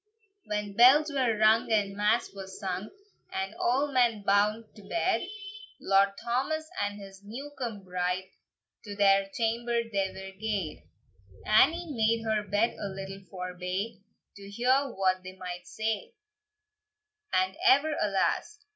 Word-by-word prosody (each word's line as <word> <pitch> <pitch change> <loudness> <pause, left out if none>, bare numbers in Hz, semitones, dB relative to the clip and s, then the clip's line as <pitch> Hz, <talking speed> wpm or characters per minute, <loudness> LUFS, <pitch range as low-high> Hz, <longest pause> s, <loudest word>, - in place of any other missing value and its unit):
When 210 -1 -3
bells 275 +7 +7
were 255 -6 +1
rung, 220 +2 +4
and 200 -2 +1
mass 210 +2 +1
was 190 -1 -9
sung, 190 0 -3 0.4
And 190 +2 -3
a' 275 +6 +1
men 235 -5 +2
bound 210 +3 +2
to 210 - -13
bed, 195 - 0 0.5
Lord 195 0 +3
Thomas 290 +6 -2
and 205 0 -2
his 195 0 -12
new 255 +8 -8
come 230 -7 -5
bride 180 +1 -2 0.5
To 205 -1 -6
their 195 -1 +4
chamber 235 +2 0
they 200 -4 -1
were 190 0 -9
gaed. 205 -7 -3 0.6
Annie 315 +10 +4
made 225 -1 +1
her 220 -1 +1
bed 205 +3 0
a - - -3
little 195 0 -7
forbye, 185 +3 -4 0.4
To 200 0 -10
hear 255 +6 +2
what 185 -3 +1
they 185 0 -10
might 180 -1 -7
say; 225 - -3 1.2
"And 185 +1 +1
ever 295 +3 +5
alas!" 210 - 0
210 Hz, 140 wpm, -29 LUFS, 195-235 Hz, 1.2 s, bells